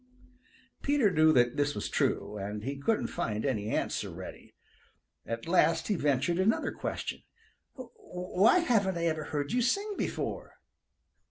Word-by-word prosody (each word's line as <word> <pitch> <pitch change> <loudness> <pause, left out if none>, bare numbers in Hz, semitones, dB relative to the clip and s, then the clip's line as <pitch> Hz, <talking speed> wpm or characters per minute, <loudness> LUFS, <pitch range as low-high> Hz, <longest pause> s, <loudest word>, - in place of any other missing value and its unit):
Peter 280 -8 +3
knew 155 -2 +5
that 125 -2 +3
this 145 0 +1
was 105 - -3
true, 105 - 0
and 105 +1 -5
he 135 +4 -3
couldn't 215 +10 +1
find 110 +1 -3
any 110 -6 -1
answer - - -1
ready. - - -10 0.7
At 115 +5 -4
last 165 -1 +3
he 205 - +2
ventured 150 +2 +1
another 210 +4 +2
question. - - -4 0.5
"Why 220 - +1
haven't 205 - +2
I 170 - -1
ever 155 -2 -1
heard 145 -1 -3
you 245 - +2
sing 400 - 0
before?" - - -4
165 Hz, 145 wpm, -30 LUFS, 130-210 Hz, 0.7 s, knew